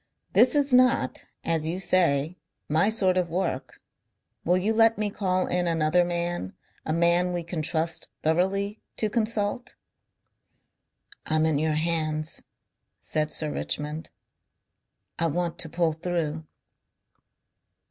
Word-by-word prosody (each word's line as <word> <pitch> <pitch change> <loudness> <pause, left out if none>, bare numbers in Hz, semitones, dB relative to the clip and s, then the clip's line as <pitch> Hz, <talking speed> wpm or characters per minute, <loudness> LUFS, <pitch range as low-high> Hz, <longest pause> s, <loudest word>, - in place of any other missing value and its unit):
"This - - +5
is 285 -2 +2
not, 250 - +3 0.2
as 160 -2 0
you 170 +3 -2
say, 170 -4 +2 0.3
my 160 +7 +2
sort 190 -4 +2
of 175 -2 -1
work. 170 -6 -3 0.6
Will 180 +2 +3
you 205 +4 +1
let 225 0 +4
me 210 -1 -1
call 185 -2 0
in 180 0 0
another 165 +1 +3
man, 175 - -2 0.3
a - - 0
man 170 +2 +2
we 175 -1 -2
can 170 -1 -4
trust 165 +1 -1
thoroughly, 195 +6 0 0.2
to 215 -2 -1
consult?" 220 +1 -1 1.5
"I'm 155 0 +2
in 155 -3 +1
your 155 0 +1
hands, 155 -1 0 0.6
said 155 -1 -1
Sir 155 -1 -1
Richmond. 150 +2 -3 1.1
I 165 - +2
want 170 +2 -2
to 160 - -2
pull 165 -1 +1
through." 160 -2 -3
170 Hz, 125 wpm, -26 LUFS, 155-185 Hz, 1.5 s, This